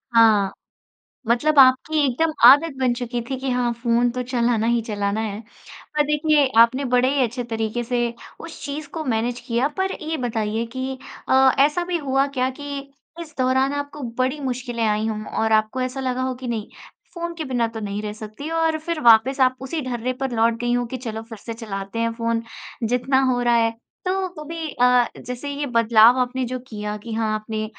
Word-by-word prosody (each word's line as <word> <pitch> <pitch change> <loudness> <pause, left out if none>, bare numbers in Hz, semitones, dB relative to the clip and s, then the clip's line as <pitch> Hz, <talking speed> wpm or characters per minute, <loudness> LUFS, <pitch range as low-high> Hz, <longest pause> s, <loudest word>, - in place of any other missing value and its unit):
हाँ। 215 -4 +5 0.7
मतलब 280 +6 +3
आपकी 265 +4 +5
एकदम 310 +5 0
आदत 290 +2 +7
बन 250 -2 +2
चुकी 240 0 -3
थी 265 - -1
कि 270 - -3
हाँ, 245 -1 +1
फ़ोन 235 +1 +1
तो 250 +1 -3
चलाना 235 -2 0
ही 235 -1 +2
चलाना 205 +1 -1
है। 210 -1 -4 0.6
पर 295 - +5
देखिए, 300 -1 +3
आपने 245 +4 +5
बड़े 250 +1 +4
ही 280 - +2
अच्छे 245 +1 -2
तरीके 225 0 -2
से 245 0 -1 0.4
उस 330 - -9
चीज़ 290 +1 -5
को 320 -2 -3
मैनेज 240 0 -1
किया। 245 +3 +1
पर 380 0 0
ये 320 +1 -2
बताइए 225 -3 -2
कि 260 0 -3 0.3
अ, 265 0 +6
ऐसा 300 +6 +3
भी 355 -1 -1
हुआ 270 +1 +2
क्या 255 +1 +1
कि 285 -1 -5 0.4
इस 310 -3 -9
दौरान 260 +1 +2
आपको 285 0 -5 0.2
बड़ी 260 +4 0
मुश्किलें 245 -3 -3
आई 215 +1 +1
हों 215 -1 -4 0.2
और 220 - +1
आपको 215 +4 +2
ऐसा 255 +1 -3
लगा 255 -1 -2
हो 260 0 -1
कि, 250 - -5
"नहीं, 225 -2 -3 0.5
फ़ोन 340 -1 -4
के 320 - -5
बिना 240 -2 +2
तो - - -4
नहीं 205 0 -4
रह 210 -1 -4
सकती।" 215 +7 -8
और 325 -1 +1
फिर 315 0 -4
वापस 240 +2 +5
आप 255 0 +4
उसी 315 +4 -3
ढर्रे 250 0 -2
पर 270 - -1
लौट 225 +1 +3
गई 240 0 0
हों 245 0 0
कि, 255 +2 -5
"चलो, 225 -3 -6
फिर 225 -1 -11
से 230 +2 -7
चलाते 200 -1 -6
हैं 230 0 0
फ़ोन, 230 0 -1 0.5
जितना 255 +3 +2
हो 245 - 0
रहा 240 -1 +3
है।" 230 0 +2 0.3
तो 370 - +2 0.2
वो 305 - -7
भी 330 -1 -4
अ, 250 -1 +4 0.2
जैसे 250 +3 -5
ये 285 +1 -3
बदलाव 230 0 +5
आपने 255 +1 0
जो 255 - -2
किया 210 -1 -5
कि 225 +2 -8
हाँ 220 -1 0
आपने 215 0 -3
245 Hz, 205 wpm, -22 LUFS, 230-275 Hz, 0.7 s, आदत